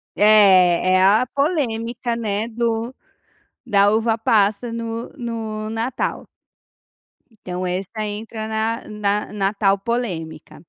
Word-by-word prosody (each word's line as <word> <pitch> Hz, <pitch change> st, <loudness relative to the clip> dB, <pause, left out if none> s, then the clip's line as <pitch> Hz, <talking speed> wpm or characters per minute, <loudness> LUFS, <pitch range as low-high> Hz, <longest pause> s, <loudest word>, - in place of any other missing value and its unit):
É, 185 Hz, -4 st, +5 dB
é 185 Hz, -, +4 dB
a 210 Hz, +6 st, +4 dB
polêmica, 240 Hz, -6 st, -1 dB
né, 215 Hz, -1 st, -2 dB
do 230 Hz, +1 st, -2 dB, 0.7 s
da 205 Hz, -3 st, +3 dB
uva-passa 220 Hz, 0 st, +1 dB
no 230 Hz, 0 st, -4 dB
no 220 Hz, -3 st, -5 dB
natal. 230 Hz, +3 st, -3 dB, 1.1 s
Então 185 Hz, -4 st, -6 dB
essa 195 Hz, +4 st, -3 dB
entra 220 Hz, +1 st, -6 dB
na 220 Hz, +1 st, -2 dB
na 210 Hz, -1 st, -2 dB
na 200 Hz, 0 st, 0 dB
tal 200 Hz, -1 st, +2 dB
polêmica. 185 Hz, -9 st, -4 dB
220 Hz, 105 wpm, -21 LUFS, 200-230 Hz, 1.1 s, É